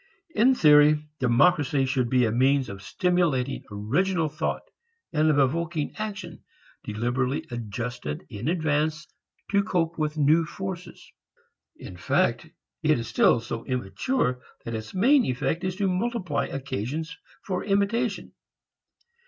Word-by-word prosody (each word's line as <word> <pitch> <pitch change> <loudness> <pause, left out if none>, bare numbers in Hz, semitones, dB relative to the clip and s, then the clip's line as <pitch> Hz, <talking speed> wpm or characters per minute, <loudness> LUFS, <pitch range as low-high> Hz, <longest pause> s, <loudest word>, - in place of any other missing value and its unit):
In 255 +2 +4
theory, 150 -3 +5
democracy 135 +2 +3
should 130 -2 0
be 125 -1 +3
a 110 - 0
means 130 +3 +2
of 100 0 -8
stimulating 150 - 0
original 155 - 0
thought, 155 - -3 0.5
and 155 0 +3
of 150 - +3
evoking 155 +3 0
action 210 -2 -6 0.4
deliberately 120 +5 -1
adjusted 115 -9 -5
in 105 - -6
advance 155 -2 0 0.5
to 200 0 +4
cope 170 -5 -1
with 155 0 -1
new 155 +3 +4
forces. 180 +1 -7 0.6
In 90 - -10
fact 115 - +1 0.3
it 155 -2 +3
is 115 - -4
still - - +4
so 115 0 -5
immature 125 - -1 0.2
that 115 - -4
its 110 - -6
main 260 +8 +5
effect 145 +7 -1
is 185 -1 -2
to 200 0 0
multiply 185 -3 -1
occasions 140 +4 -4 0.3
for 185 -2 -2
imitation. 200 +2 0
150 Hz, 130 wpm, -26 LUFS, 125-180 Hz, 0.6 s, theory